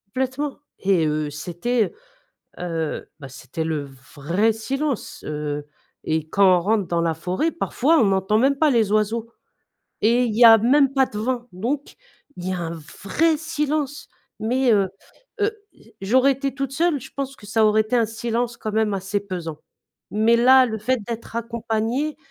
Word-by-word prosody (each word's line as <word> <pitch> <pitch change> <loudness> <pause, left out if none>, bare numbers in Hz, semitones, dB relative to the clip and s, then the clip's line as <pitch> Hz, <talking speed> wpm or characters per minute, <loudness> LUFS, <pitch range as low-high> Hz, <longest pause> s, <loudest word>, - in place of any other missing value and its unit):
Complètement. 265 +2 -2 0.2
Et 190 -5 +2
heu, 150 0 -1
c'était, 175 +10 -1 0.7
heu - - -6
heu, 165 -3 -3
bah, 140 - -8
c'était 135 +4 -6
le 155 -3 -2 0.3
vrai 175 +10 +1
silence, 270 +4 -3
heu, 150 -1 -4 0.4
et 160 0 -2
quand 190 -1 +5
on - - -1
rentre 205 0 +1
dans 170 -1 0
la 165 -1 0
forêt, 185 - -1
parfois, 320 -1 +1
on 230 - +4
n'entend 195 +2 +2
même 270 +5 +3
pas 305 +2 +3
les 225 -5 +2
oiseaux 220 +2 0 0.7
et 235 +3 +4
il 220 -3 -2
y 240 - +5
a 225 -1 +10
même 270 +5 +3
pas 270 -1 +4
de 210 - -8
vent. 240 +2 -2
Donc 255 +10 -3 0.4
il 180 - -6
y - - -1
a 180 - -3
un 165 -1 -4 0.3
vrai 315 - +2
silence. 300 -2 -2 0.3
Mais 250 +3 +2
heu 195 -2 +2 0.5
heu, 415 +2 +2 0.2
j - - -22
j'aurais 260 +7 +4
été 275 0 -3
toute 275 -1 -4
seule, 325 0 +1
je - - -12
pense 275 -1 -4
que 205 - -14
ça 220 +1 +2
aurait 215 0 +4
été 215 +3 -2
un 235 -2 +3
silence 230 +2 -3
quand 215 - -5
même 215 -1 +1
assez 195 +1 -2
pesant. 175 -6 -6 0.5
Mais 220 +3 +3
là, 255 +2 +6
le 220 -3 -3
fait 250 +4 0
d'être 230 -1 -6
accompagnée, 235 +5 -2
225 Hz, 180 wpm, -22 LUFS, 190-260 Hz, 0.7 s, a